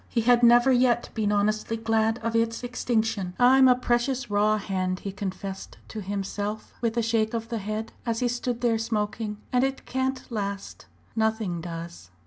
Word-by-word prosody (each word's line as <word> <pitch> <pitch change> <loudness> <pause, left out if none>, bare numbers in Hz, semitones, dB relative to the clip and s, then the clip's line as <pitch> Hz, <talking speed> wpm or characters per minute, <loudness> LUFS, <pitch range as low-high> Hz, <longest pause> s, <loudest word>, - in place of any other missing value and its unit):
He 235 - +1
had 240 +1 +4
never 240 +2 +6
yet 245 -1 +3
been 210 -2 0
honestly 215 +2 0
glad 225 0 +1
of 230 0 -1
its 230 +1 0
extinction. 225 -6 -1
"I'm 260 +2 +6
a 250 - +6
precious 245 0 0
raw 210 +1 +3
hand," 185 -2 -2
he 200 - -4
confessed 195 0 -6
to 215 - -5
himself 205 +2 -4
with 230 -1 -1
a 235 - +2
shake 225 0 +1
of 230 0 -4
the 230 -2 -2
head 215 +2 -4
as 230 -2 -1
he 250 - +2
stood 245 0 -2
there 230 -2 +2
smoking. 215 -1 -2 0.2
"And 250 0 +4
it 270 0 -2
can't 260 0 -1
last 200 -3 -4 0.3
nothing 220 -6 0
does." 165 - -7
225 Hz, 175 wpm, -26 LUFS, 205-240 Hz, 0.3 s, never